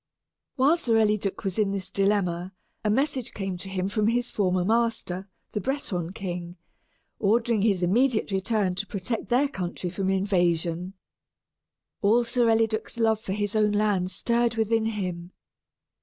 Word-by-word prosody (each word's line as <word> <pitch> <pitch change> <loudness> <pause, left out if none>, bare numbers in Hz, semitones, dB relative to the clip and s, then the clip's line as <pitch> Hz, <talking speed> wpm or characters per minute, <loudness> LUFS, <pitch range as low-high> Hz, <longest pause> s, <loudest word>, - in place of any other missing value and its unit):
While 285 +5 +4
Sir 240 -9 +1
Eliduc 210 -3 +1
was 195 +1 -2
in 210 -2 +3
this 195 -1 -4
dilemma, 195 -2 0 0.3
a 215 - +1
message 260 +1 0
came 195 -2 -3
to 195 - -7
him 190 -1 -1
from 210 +1 +1
his 245 +2 0
former 185 -3 +1
master, 220 -4 0 0.2
the 210 - -2
Breton 185 - -2
king, 180 -3 -5 0.6
ordering 225 +1 +2
his 195 -4 +2
immediate 225 +4 +2
return 195 0 +1
to 195 +3 -3
protect 220 +2 -3
their 255 +4 +3
country 180 -6 -4
from 190 +1 -1
invasion. 180 -2 0 1.1
All 225 +4 +4
Sir 235 0 +1
Eliduc's 225 0 +1
love 220 -2 +2
for 190 - -4
his 205 +1 -2
own 210 -1 +3
land 205 -3 +1
stirred 235 +5 +1
within 225 0 +1
him. 185 -5 -4
205 Hz, 150 wpm, -26 LUFS, 185-225 Hz, 1.1 s, While